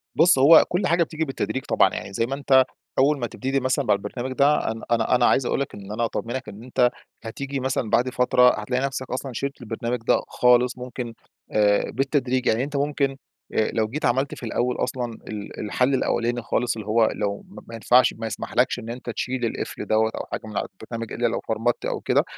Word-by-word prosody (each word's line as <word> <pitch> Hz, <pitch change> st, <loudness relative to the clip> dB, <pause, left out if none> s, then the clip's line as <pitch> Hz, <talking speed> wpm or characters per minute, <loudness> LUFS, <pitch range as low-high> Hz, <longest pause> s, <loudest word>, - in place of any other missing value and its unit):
بُص، 165 Hz, -3 st, +5 dB
هو 145 Hz, +5 st, +8 dB
كل 180 Hz, +3 st, 0 dB
حاجة 170 Hz, 0 st, +3 dB
بتيجي 160 Hz, 0 st, -3 dB
بالتدريج 135 Hz, -1 st, -3 dB
طبعًا. -, -, +4 dB
يعني 100 Hz, -, -6 dB
زي 115 Hz, -, +1 dB
ما 135 Hz, +3 st, -3 dB
أنت 135 Hz, -2 st, +4 dB, 0.4 s
أول 140 Hz, +1 st, +3 dB
ما 120 Hz, -, -2 dB
تبتدي 135 Hz, +4 st, -2 dB
مثلًا 130 Hz, +1 st, 0 dB
مع 105 Hz, -, +4 dB
البرنامج 120 Hz, +6 st, -4 dB
ده 140 Hz, -4 st, +3 dB
أنا 110 Hz, -, -7 dB
أنا 120 Hz, +1 st, +3 dB
أنا 125 Hz, -1 st, +3 dB
عايز 130 Hz, -, +3 dB
أقول -, -, 0 dB
لك 140 Hz, -, -4 dB
إن 100 Hz, 0 st, -9 dB
أنا 115 Hz, +2 st, 0 dB
أطمنك 120 Hz, 0 st, -4 dB
إن 105 Hz, +2 st, -11 dB
أنت 125 Hz, 0 st, +2 dB, 0.3 s
هتيجي 140 Hz, +4 st, -4 dB
مثلًا 130 Hz, -3 st, -1 dB
بعد 125 Hz, +3 st, +2 dB
فترة 125 Hz, -1 st, +4 dB
هتلاقي 125 Hz, +5 st, -1 dB
نفسك 130 Hz, -1 st, -4 dB
أصلًا 130 Hz, 0 st, -4 dB
شِلت 140 Hz, +1 st, -4 dB
البرنامج 115 Hz, +1 st, -3 dB
ده -, -, +4 dB
خالص 125 Hz, +1 st, +3 dB
ممكن 125 Hz, -1 st, -6 dB, 0.4 s
آآ 105 Hz, -1 st, +2 dB
بالتدريج. 130 Hz, -1 st, 0 dB
يعني 115 Hz, +3 st, +2 dB
أنت 145 Hz, +1 st, -5 dB
ممكن 140 Hz, -1 st, 0 dB, 0.4 s
أ 110 Hz, -, +1 dB
لو 110 Hz, -1 st, +1 dB
جيت 145 Hz, +5 st, -3 dB
عملت 130 Hz, +3 st, +1 dB
في -, -, -12 dB
الأول 120 Hz, +2 st, -1 dB
أصلًا 125 Hz, -2 st, -2 dB
ال 105 Hz, -1 st, -7 dB
الحل 125 Hz, +6 st, +1 dB
الأولاني 120 Hz, -1 st, 0 dB
خالص 120 Hz, +1 st, -1 dB
اللي 110 Hz, -2 st, -7 dB
هو 110 Hz, +1 st, +4 dB
لو 100 Hz, -, -3 dB
م -, -, -11 dB
ما 115 Hz, -, -8 dB
ينفعش 125 Hz, +3 st, +4 dB
ما 115 Hz, 0 st, -5 dB
يسمحلكش 125 Hz, +2 st, 0 dB
إن 115 Hz, -, -8 dB
أنت 120 Hz, +1 st, -6 dB
تشيل 125 Hz, +1 st, -2 dB
القفل -, -, -4 dB
دوّة 110 Hz, +1 st, +2 dB
أو -, -, -5 dB
حاجة -, -, -3 dB
من 105 Hz, -2 st, -6 dB
على -, -, -1 dB
البرنامج 115 Hz, 0 st, -6 dB
إلّا -, -, +1 dB
لو -, -, -1 dB
فرمت -, -, -1 dB
أو -, -, -2 dB
كده، -, -, +2 dB
125 Hz, 215 wpm, -24 LUFS, 115-135 Hz, 0.4 s, هو